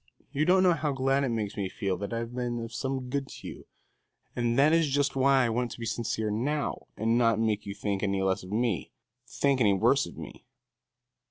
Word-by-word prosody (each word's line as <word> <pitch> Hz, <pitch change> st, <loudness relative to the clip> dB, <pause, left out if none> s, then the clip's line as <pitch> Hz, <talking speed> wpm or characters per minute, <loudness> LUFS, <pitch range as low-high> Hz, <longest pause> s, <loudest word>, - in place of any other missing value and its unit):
You 150 Hz, +2 st, +1 dB
don't 185 Hz, +2 st, +5 dB
know 180 Hz, -2 st, +5 dB
how 150 Hz, -2 st, -1 dB
glad 135 Hz, +1 st, +1 dB
it 135 Hz, -, 0 dB
makes 110 Hz, -3 st, -2 dB
me 100 Hz, -2 st, -2 dB
feel 95 Hz, -1 st, -2 dB
that 100 Hz, +3 st, -5 dB
I 115 Hz, -, -2 dB
have 115 Hz, +1 st, -4 dB
been 120 Hz, -1 st, -2 dB
of 115 Hz, +1 st, -8 dB
some 130 Hz, 0 st, -3 dB
good 140 Hz, -1 st, -1 dB
to -, -, -10 dB
you, -, -, -10 dB, 0.7 s
and 120 Hz, 0 st, 0 dB
that 145 Hz, +3 st, +5 dB
is 165 Hz, -2 st, +3 dB
just 140 Hz, 0 st, +1 dB
why 135 Hz, -1 st, +4 dB
I -, -, +1 dB
want 120 Hz, +2 st, -1 dB
to -, -, -12 dB
be 115 Hz, -, -4 dB
sincere 110 Hz, -1 st, -2 dB
now 140 Hz, +7 st, -2 dB
and 115 Hz, +2 st, +2 dB
not 115 Hz, -3 st, +3 dB
make 110 Hz, -2 st, 0 dB
you 100 Hz, -, -5 dB
think 100 Hz, -2 st, -2 dB
any 100 Hz, -1 st, 0 dB
less 95 Hz, 0 st, +1 dB
of 90 Hz, -, -10 dB
me 110 Hz, -5 st, 0 dB, 0.4 s
think 140 Hz, -2 st, +1 dB
any 105 Hz, -3 st, +5 dB
worse 95 Hz, -, +3 dB
of -, -, -12 dB
me." -, -, -9 dB
120 Hz, 230 wpm, -28 LUFS, 105-135 Hz, 0.7 s, don't